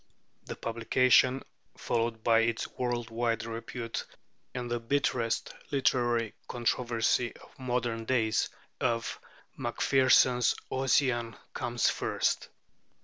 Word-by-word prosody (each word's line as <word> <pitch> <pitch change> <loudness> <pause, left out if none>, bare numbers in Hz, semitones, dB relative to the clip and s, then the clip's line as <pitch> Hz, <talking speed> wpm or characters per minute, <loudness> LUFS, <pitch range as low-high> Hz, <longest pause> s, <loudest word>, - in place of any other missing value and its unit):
The - - -6
publication 125 +3 +3 0.3
(followed 115 -1 -1
by 115 -1 +5
its 115 0 0
world 120 -2 -3
wide 115 -1 -1
repute 115 +1 -5 0.5
and 125 -1 -3
the 120 - 0
bitterest 115 -2 0 0.2
literary 120 -5 +1
controversy 120 0 0
of - - -18
modern 120 -3 -2
days) 110 -3 +1 0.3
of 115 -2 -1 0.4
Macpherson's 130 -2 +3 0.2
'Ossian' 130 -3 +1 0.2
comes 120 -1 0
first. - - 0
120 Hz, 95 wpm, -30 LUFS, 115-125 Hz, 0.5 s, by